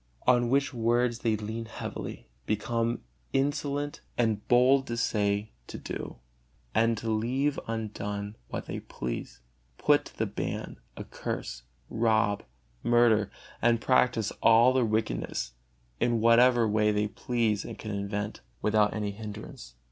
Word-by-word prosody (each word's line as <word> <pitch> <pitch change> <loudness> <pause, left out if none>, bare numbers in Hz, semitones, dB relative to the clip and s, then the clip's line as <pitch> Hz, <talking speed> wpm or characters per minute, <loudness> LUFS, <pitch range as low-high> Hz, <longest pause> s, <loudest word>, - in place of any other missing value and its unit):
On 120 -1 +4
which 140 +1 +2
words 120 0 +1
they 115 -2 +1
lean 110 +2 -4
heavily, 110 - -6 0.2
become 115 +2 -1 0.3
insolent 145 +1 -1 0.2
and 110 -3 0
bold 130 +2 +5
to 120 - -3
say, 105 -2 0 0.2
to - - -7
do, - - -6 0.6
and 115 0 +3
to 115 - -5
leave 130 +6 0
undone 105 -2 -4
what - - -5
they - - -4
please; - - -6 0.4
put - - +3
to - - -13
the - - +1
ban, - - -4 0.2
accurse, - - -5 0.3
rob, 110 -3 +2 0.4
murder, 120 -3 +4 0.3
and 115 0 +4
practise 120 -3 +2
all 115 +3 +6
their 130 -2 +3
wickedness, 110 - -1 0.5
in 120 -1 +2
whatever 115 +1 +5
way 105 0 +3
they 105 0 +1
please 110 -2 0
and - - -7
can 110 - -6
invent, 105 +1 -3 0.2
without 105 -1 +3
any 105 -1 -2
hindrance. 105 - -9
115 Hz, 135 wpm, -29 LUFS, 105-120 Hz, 0.6 s, all